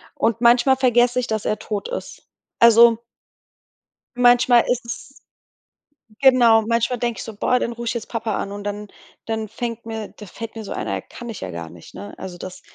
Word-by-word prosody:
und 230 0 0
manchmal 245 +3 +5
vergesse 245 -1 +3
ich, 245 - -5
dass 220 -1 -3
er 215 - 0
tot 210 -2 -4
ist. - - -7 0.3
Also 235 0 +6 1.1
manchmal 245 -1 +5
ist 245 -1 -1
es 235 +3 -8 1.1
Genau, 245 -4 +6
manchmal 235 +1 0
denke 240 -1 -2
ich - - -5
so: 220 - -9
„Boah, 250 +4 +1
dann 235 - -2
ruf 235 0 -7
ich - - 0
jetzt 235 -2 -6
Papa 225 -2 -2
an”, 200 - -4
und 205 0 -7
dann 205 0 -5 0.4
dann 220 -1 -3
fängt 230 +1 -6
mir 220 -2 -6
da 210 - -13
fällt 225 +4 -9
mir 225 - -6
so 200 - -9
ein: - - -4
„Ja - - -2
kann 240 -1 -10
ich 225 - -7
ja - - -5
gar 85 -1 -7
nicht”, 85 0 -15
ne? 100 +2 -9
Also, 180 -2 -8
das 185 +1 -9
230 Hz, 200 wpm, -21 LUFS, 215-240 Hz, 1.1 s, Also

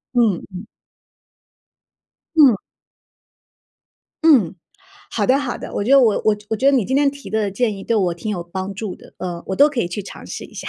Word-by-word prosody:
嗯 225 -7 +3
嗯。 185 +4 -7 1.7
嗯。 270 -8 +7 1.7
嗯， 235 - +5 0.6
好 210 -3 -1
的 260 +2 +4
好 270 -4 -3
的， - - -8
我 - - -1
觉 245 - -2
得 275 0 +8
我 225 -5 +4
我 210 0 0
觉 275 +5 +4
得 - - -1
你 235 - +1
今 265 +5 0
天 285 -1 +3
提 280 0 -11
的 215 -2 0
建 215 +1 -1
议 195 - -9
对 230 - +1
我 180 -4 +1
挺 210 +6 -5
有 180 -4 -3
帮 190 +3 -6
助 205 -2 -5
的。 - - -17
呃， 175 -2 -5
我 190 - -3
都 290 +1 +6
可 265 -5 -2
以 175 - -1
去 190 +4 -5
尝 195 - -11
试 - - -7
一 - - -14
下， - - -6
215 Hz, 220 characters per minute, -20 LUFS, 190-260 Hz, 1.7 s, 得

